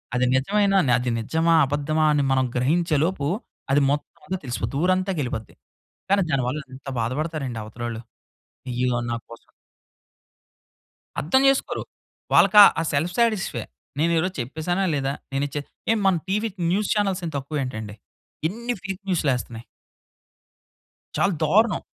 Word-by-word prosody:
అది 125 0 +2
నిజమేనా, 195 +8 +2 0.2
అది 125 -1 -1
నిజమా, 160 +8 +2
అబద్దమా 145 +3 0
అని 145 -1 +2
మనం 130 -1 +3
గ్రహించే‌లోపు, 155 +3 +1 0.5
అది 145 +1 +4
మొత్తం 145 +1 -4
అంతా 185 0 -2
తెలిసిపోద్ది. 125 +2 -3
ఊరంతాకి 185 -1 +1
వెళ్ళిపోద్ది. 110 -5 -5 0.6
కానీ 200 -1 +4
దానివల్ల 135 +2 0
ఎంత 135 +1 -14
బాధపడతారండి 130 -1 -3
అవతలోళ్ళు. 115 +1 -6 0.7
ఇయ్యో! 125 0 0
నా 120 - -1
కోసం 115 - -14 1.7
అర్థం 220 - +3
చేసుకోరు. 270 0 +1 0.5
వాళ్ళకి 210 - +6 0.2
ఆ - - +1
సెల్ఫ్ 160 +5 0
సాటిస్ఫై. 225 -5 +1 0.3
నేను 165 +3 +2
ఈరోజు 180 +3 -1
చెప్పేసానా, 160 +9 -2
లేదా? 135 -1 0 0.2
నేను 140 +1 +1
చే 145 - -1 0.5
మన 190 - +5
టీవీ 210 +4 0 0.2
న్యూస్ 200 +3 0
చానెల్స్ 195 -3 0
ఏం - - -3
తక్కువ 140 +1 -3
ఏంటండి! 110 -4 -6 0.5
ఇన్ని 235 +6 -3
ఫేక్ 195 0 -5
న్యూస్‌లేస్తున్నాయి. 125 -8 -1 1.5
చాలా 200 -2 +2
దారుణం. 200 +5 +3
155 Hz, 125 wpm, -24 LUFS, 130-190 Hz, 1.7 s, వాళ్ళకి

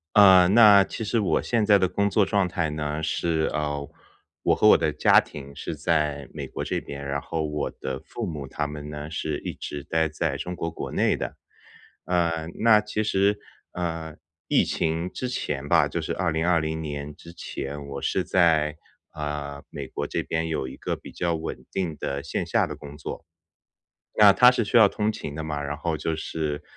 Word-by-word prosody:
呃， 95 -3 +8
那 105 -2 +8
其 110 - -6
实 115 +2 0
我 100 - +1
现 115 -3 +1
在 100 -1 +6
的 95 - +3
工 100 +2 +1
作 105 +1 +3
状 100 -1 +1
态 85 -3 -1
呢， 75 0 -3
是， 80 0 0
呃， 75 -2 -2 0.5
我 - - +4
和 - - +4
我 - - +8
的 - - 0
家 - - +6
庭 70 -1 -8
是 - - -5
在 75 -4 0
美 - - -5
国 - - -5
这 - - -1
边， 70 0 -8
然 70 +1 -1
后 80 +2 -3
我 75 -1 -2
的 65 0 -5
父 - - -6
母 75 -5 -5
他 75 +3 -3
们 75 0 -7
呢 75 0 -6
是 80 -2 -3
一 - - -6
直 70 -1 -6
待 80 +2 +1
在 75 -1 -2
中 90 +4 -5
国 85 -1 -3
国 - - -6
内 - - +2
的。 - - -5 0.7
呃， 85 -3 0
那 110 -1 +6
其 105 0 -2
实， 100 0 +2 0.3
呃， 80 -3 -4 0.3
疫 - - +4
情 80 +3 -1
之 125 - -4
前 75 - -3
吧， 80 -2 +4
就 70 - -3
是 80 - -3
2020 80 -2 0
年 75 -1 -5
之 85 +3 -13
前， 70 -2 -6
我 70 - -5
是 - - 0
在， 80 -4 +3 0.4
呃， 75 -1 -5
美 - - -6
国 - - -4
这 - - -2
边 80 0 -2
有 80 -5 -2
一 65 - -9
个 - - -3
比 - - -12
较 85 -1 -1
稳 80 0 -5
定 85 -6 -2
的 70 +1 -3
线 - - -3
下 - - +1
的 - - -6
工 75 -1 -11
作。 75 - -7 0.9
对 105 - +6
啊 100 - +9
它 125 +4 +8
是 125 -2 +1
需 110 - +2
要 110 -3 +8
通 105 +1 0
勤 75 -8 -7
的 80 - -4
嘛， 75 -2 -3
然 70 +1 -4
后 80 +1 -2
就 80 +2 -2
是， 75 -1 -3
80 Hz, 215 characters per minute, -25 LUFS, 75-90 Hz, 0.9 s, 啊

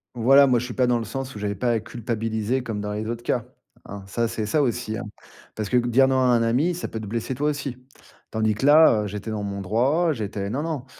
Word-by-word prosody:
Voilà. 135 +4 +6
Moi 125 -2 +3
je 125 - -4
suis 125 - -6
pas 125 - +2
dans 120 -1 +2
le 115 - -4
sens 135 +4 -5
où - - -6
j'avais 100 0 -2
pas 120 +5 0
à 115 - +1
culpabiliser 115 +2 -2
comme 110 -4 -4
dans 105 0 -4
les 105 +1 -4
autres 120 0 -5
cas, 120 -3 -1 0.4
hein. 100 -1 -8
Ça, 115 +4 -1
c'est 110 -1 -3
ça, 150 +8 +1
aussi, 120 -4 -1
hein. - - -5 0.5
Parce 105 -2 -4
que 125 - +3
dire 125 +2 +3
non 130 0 +2
à 130 - +3
un 120 -2 +3
ami, 135 +10 +1
ça 175 - -4
peut 110 - -6
te 110 - -7
blesser 115 +4 -3
toi 150 +3 0
aussi. 140 -4 -4 0.5
Tandis 110 -1 +1
que 110 +6 -3
là, 145 -7 +6
heu, - - -3
j'étais 105 +2 -6
dans 105 -1 -3
mon 100 -1 -4
droit. 135 - +1
J'étais 100 -4 -4
non, 135 +5 -2
non, 155 -5 -4
120 Hz, 260 wpm, -24 LUFS, 110-130 Hz, 0.5 s, Voilà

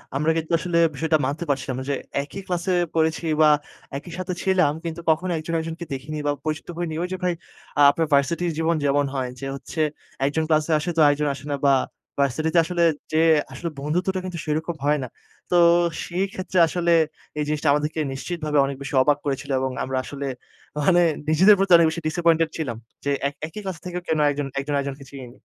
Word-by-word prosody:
আমরা 155 +4 +2
কিন্তু 160 0 -3
আসলে 175 -1 -1 0.2
বিষয়টা 155 +2 +1
মানতে 145 +5 -2
পারছিলাম 135 -2 -1
না - - -4
যে, 140 - +1 0.3
একই 195 +7 -8
ক্লাসে 180 +1 -1 0.2
পড়েছি 160 +1 +1 0.2
বা 155 - +7 0.5
একই 165 +5 -9
সাথে 185 0 -3
ছিলাম 185 -6 +3
কিন্তু 165 0 -5
কখনো 170 +3 +2
একজন, 155 +2 -5
একজনকে 165 +1 -5
দেখিনি 145 +3 -5
বা 145 - +3
পরিচিত 155 0 -3
হইনি। 170 -2 -3
ওই - - -1
যে, 185 - -2
ভাই 180 - +2 0.5
আ - - +6
আপনার 160 +2 -1
ভার্সিটির 165 +5 +2
জীবন 165 +1 +1
যেমন 140 +1 +2
হয়। 130 -2 -1
যে, 135 - -5
হচ্ছে 155 +3 -5 0.4
১ 140 - +3
জন 160 - +2
ক্লাসে 155 +1 +2
আসে 175 - -3
তো 165 - 0
আরেকজন 145 +1 +3
আসে 140 - -11
না 145 - +1
বা 135 - +6 0.5
ভার্সিটিতে 155 +5 +1
আসলে 175 0 0 0.3
যেয়ে 160 +1 +4 0.2
আসলে 170 +6 -4
বন্ধুত্বটা 180 +6 -1
কিন্তু 180 -2 -5
সেরকম 160 +2 -2
হয় 150 +1 +3
না। - - -4 0.4
তো 180 - +3 0.5
সেই 180 +3 -1
ক্ষেত্রে 185 0 -4
আসলে 170 0 0 0.5
এই 150 - +1
জিনিসটা 150 0 -1
আমাদেরকে 150 +2 -1
নিশ্চিতভাবে 150 +1 -3
অনেক 135 -1 -4
বেশি 140 - -6
অবাক 145 +2 +3
করেছিল 140 0 -3
এবং 130 0 -1
আমরা 130 0 -2
আসলে 140 +1 -6 0.6
মানে 175 +3 +4 0.3
নিজেদের 190 +7 +7
প্রতি 195 0 0
অনেক 170 -1 +6
বেশি 170 +2 -5
ডিসাপয়েন্টেড 165 0 +2
ছিলাম। 130 -8 -3 0.3
যে, 140 - +1 0.2
এক 140 - -5
একই 210 +6 -8
ক্লাস 190 -3 -4
থেকেও 180 0 -4
কেন 160 - +1
একজন, 145 -1 -3
আর 140 +1 -1
একজনকে 140 0 -5
চিনিনি। 130 -3 -11
160 Hz, 195 wpm, -23 LUFS, 145-170 Hz, 0.6 s, বা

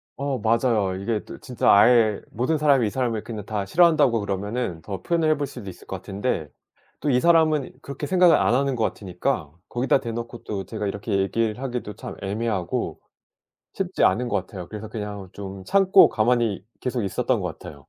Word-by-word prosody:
어 140 -2 -2
맞아요. 110 -4 +1
이게 105 +2 -2
또 - - -9
진짜 125 - +1
아예 110 0 +5
모든 130 +8 0
사람이 140 -6 +3
이 - - -1
사람을 115 -3 -1
그냥 105 -4 -7
다 105 -2 -3
싫어한다고 155 - +4
그러면은 100 -2 -3
더 95 +3 -6
표현을 165 -2 +1
해볼 145 -2 0
수도 110 -8 -8
있을 90 - -12
것 - - -5
같은데 95 - -3 0.5
또 145 - +1
이 125 - +4
사람은 160 -3 +3
그렇게 140 +1 -5
생각을 180 -3 +5
안 120 - +3
하는 135 -1 +1
것 115 - -1
같으니까 90 - -2 0.2
거기다 130 +2 +2
대놓고 120 -1 -6
또 100 -2 -4
제가 105 -2 -4
이렇게 100 0 -2
얘기를 110 +3 0
하기도 125 -5 -4
참 - - -8
애매하고 105 -2 -2 0.8
쉽지 - - -2
않은 120 +7 +3
거 - - -3
같아요. 95 -1 -5
그래서 110 0 -7
그냥 105 -3 -6
좀 95 -1 -8
참고 195 -1 +6
가만히 115 -4 +1 0.2
계속 125 -4 -2
있었던 95 - 0
것 - - -4
같아요. 75 - -10
115 Hz, 390 characters per minute, -24 LUFS, 100-130 Hz, 0.8 s, 참고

